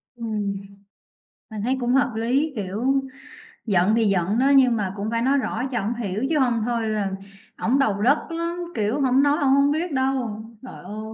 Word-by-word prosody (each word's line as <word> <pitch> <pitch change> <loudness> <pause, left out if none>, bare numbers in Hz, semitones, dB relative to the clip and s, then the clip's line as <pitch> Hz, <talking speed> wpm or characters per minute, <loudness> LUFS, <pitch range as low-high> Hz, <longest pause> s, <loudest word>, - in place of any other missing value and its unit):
Ừm. 215 -4 -3 1.0
Mình 215 -2 -5
thấy 255 +3 0
cũng 240 - -2
hợp 265 -2 +3
lý, 260 +7 0
kiểu, 225 +7 0 0.6
giận 200 0 +3
thì 225 -1 +2
giận 195 +3 +1
đó 270 +2 +3
nhưng 255 -3 +5
mà 195 -3 -2
cũng 205 +2 -3
phải 230 0 0
nói 275 +3 +2
rõ 250 -2 -2
cho 240 - 0
ổng 215 +4 -2
hiểu 210 0 -3
chứ 310 - +2
hông 240 -4 +2
thôi 235 -2 -1
là 210 -3 -1 0.5
ổng 260 +4 +1
đầu 205 -6 +1
đất 270 +7 +4
lắm, 335 +1 -3 0.2
kiểu, 220 +6 0
hổng 265 +1 +3
nói 290 +1 +3
ổng 275 -2 +3
hổng 280 +1 +4
biết 330 +3 -1
đâu, 260 -5 -1 0.2
trời 260 - -11
ơi. 215 +1 -7
235 Hz, 200 wpm, -23 LUFS, 215-270 Hz, 1.0 s, nhưng